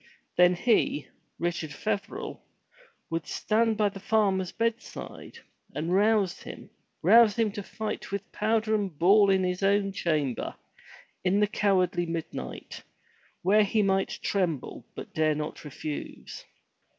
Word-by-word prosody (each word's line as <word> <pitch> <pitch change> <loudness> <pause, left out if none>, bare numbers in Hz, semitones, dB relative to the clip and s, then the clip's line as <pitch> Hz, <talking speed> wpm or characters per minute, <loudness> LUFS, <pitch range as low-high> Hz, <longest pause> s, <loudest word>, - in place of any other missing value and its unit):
Then 180 0 +5
he, 195 -7 +2 0.3
Richard 170 -3 -2
Feverel, 205 +2 -4 0.7
would 165 -2 -2
stand 225 0 +1
by 210 -1 +3
the 195 0 -10
farmer's 195 -3 +1
bedside, 230 +1 -4 0.4
and 165 +4 -1
rouse 205 -1 +2
him, - - -10 0.3
rouse 215 +3 +7
him 225 -2 +1
to 205 0 -5
fight 215 +1 -5
with 200 0 -4
powder 220 0 +1
and 200 -7 -1
ball 200 +5 +5
in 190 -1 +3
his 180 +1 -1
own 200 0 +2
chamber, 155 -9 -1 0.7
in 190 +2 +2
the 210 - +5
cowardly 185 -4 +1
midnight, 165 - -6 0.6
where 210 +4 +5
he 210 +1 +1
might 195 -1 +1
tremble, 175 -9 -1
but - - -8
dare 155 -1 +2
not 150 0 -5
refuse. 150 0 -7
195 Hz, 130 wpm, -28 LUFS, 175-210 Hz, 0.7 s, rouse